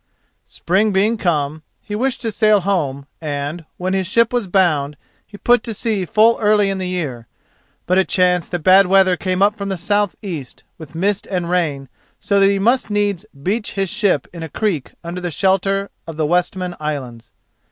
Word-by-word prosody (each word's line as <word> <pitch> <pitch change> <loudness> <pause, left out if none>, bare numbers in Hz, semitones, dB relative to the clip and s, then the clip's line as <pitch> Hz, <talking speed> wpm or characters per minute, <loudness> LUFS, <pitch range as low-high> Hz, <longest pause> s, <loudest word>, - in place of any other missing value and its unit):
Spring 200 +5 0
being 205 +4 +2
come, 155 -6 -1 0.2
he 210 - -9
wished 255 +3 -1
to 225 - -1
sail 215 -1 +3
home, 150 -8 -1 0.2
and, 150 +2 -4
when 185 +1 -2
his 190 -2 0
ship 230 +4 +2
was 240 -5 0
bound, 155 -7 +1 0.3
he 205 - -12
put 240 +2 +3
to 225 -2 -5
sea 210 -4 -1
full 225 +5 +4
early 210 -2 +3
in 195 - -3
the 185 - -3
year. 140 -11 -4 0.6
But 185 +1 +3
it 190 - +1
chanced 180 -2 +2
that 175 -3 -4
bad 190 +2 +6
weather 190 -1 +4
came 185 +1 0
up 205 +1 +3
from 200 -2 -5
the 190 - -2
south 205 +3 0
east, 160 -10 -7 0.2
with 160 0 -11
mist 195 +4 0
and 180 -3 -2
rain, 150 -7 -1 0.3
so 200 -1 +1
he 195 0 +4
must 235 +5 +1
needs 205 -1 -1 0.2
beach 210 +5 -1
his 195 -2 -1
ship 195 - +1
in 170 - -8
a 160 - -6
creek 165 - -2
under 175 +1 -4
shelter 195 +3 0 0.2
of 165 -2 -7
the 155 - +1
Westman 180 +2 -1
Islands. 125 -7 -5
185 Hz, 185 wpm, -19 LUFS, 165-205 Hz, 0.6 s, bad